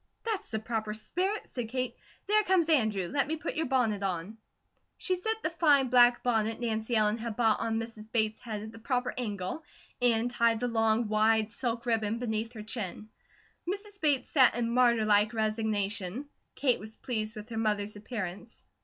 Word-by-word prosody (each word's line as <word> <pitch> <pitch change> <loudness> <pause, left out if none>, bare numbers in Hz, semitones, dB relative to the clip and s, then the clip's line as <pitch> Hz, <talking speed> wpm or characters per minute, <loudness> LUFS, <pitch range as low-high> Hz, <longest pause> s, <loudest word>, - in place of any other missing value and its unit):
"That's 430 -3 -2
the 220 - -2
proper 220 -1 -3
spirit," 375 - -2
said 240 -3 -5
Kate. 255 0 -2 0.3
"There 425 +1 +4
comes 370 -5 +2
Andrew. 220 - +2
Let 275 +8 0
me 315 - -1
put 315 +1 -4
your 320 -2 -1
bonnet 235 -6 +1
on." 190 +3 -3 0.6
She 370 - 0
set 440 +5 -3
the 315 - 0
fine 290 -6 +4
black 240 -1 +5
bonnet 225 -2 +1
Nancy 225 0 -1
Ellen 215 +1 +2
had 230 -1 -4
bought 225 -2 +3
on 225 0 0
Mrs. 225 -1 -8
Bates' 220 -2 +1
head 215 -3 -5
at 220 - -8
the 225 - -12
proper 250 +1 -1
angle 210 - -4 0.4
and 240 0 +3
tied 230 -2 +2
the 245 - 0
long, 225 -1 +2
wide 215 0 +3
silk 235 -1 -3
ribbon 225 -2 +1
beneath 225 -1 -2
her 215 -2 -7
chin. 215 -1 -5 0.6
Mrs. 400 +1 -5
Bates 285 -5 +2
sat 260 -6 +5
in 235 -1 -1
martyr 235 -2 +4
like 210 +2 +3
resignation. 215 0 -1 0.3
Kate 260 -3 +2
was 220 +1 -10
pleased 220 -3 -3
with 210 +2 -8
her 225 - -5
mother's 210 -1 0
appearance. 210 0 -6
225 Hz, 180 wpm, -30 LUFS, 215-250 Hz, 0.6 s, black